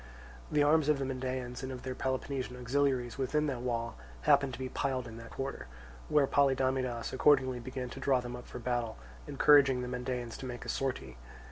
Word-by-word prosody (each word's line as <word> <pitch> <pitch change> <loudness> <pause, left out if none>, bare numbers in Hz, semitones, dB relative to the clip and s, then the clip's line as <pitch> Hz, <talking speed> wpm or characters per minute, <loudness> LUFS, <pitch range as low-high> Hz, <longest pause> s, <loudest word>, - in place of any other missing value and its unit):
The 150 -1 +4
arms 150 0 +4
of 150 - +4
the 135 - -2
Mendaeans 130 -1 -3
and 130 0 -4
of 125 -1 -7
their 130 -1 -3
Peloponnesian 130 -1 -3
auxiliaries 125 0 0
within 150 +3 +1
the 135 -5 -2
wall 115 - -2 0.2
happened 140 - +4
to 120 - -7
be 130 - -2
piled 130 -1 -2
in 115 -1 -9
that 115 0 -9
quarter, 135 - -5 0.4
where 150 -2 +5
Polydamidas 130 -3 +1
accordingly 130 -2 +4
began 125 +1 -5
to 135 - -7
draw 135 -1 +3
them 120 0 -5
up 125 - -10
for - - -8
battle, 120 -2 -2 0.3
encouraging 135 -4 +5
the - - -4
Mendaeans 125 -1 -3
to 130 - -6
make 120 -1 -6
a - - -6
sortie. 70 - -2
130 Hz, 195 wpm, -32 LUFS, 125-135 Hz, 0.4 s, where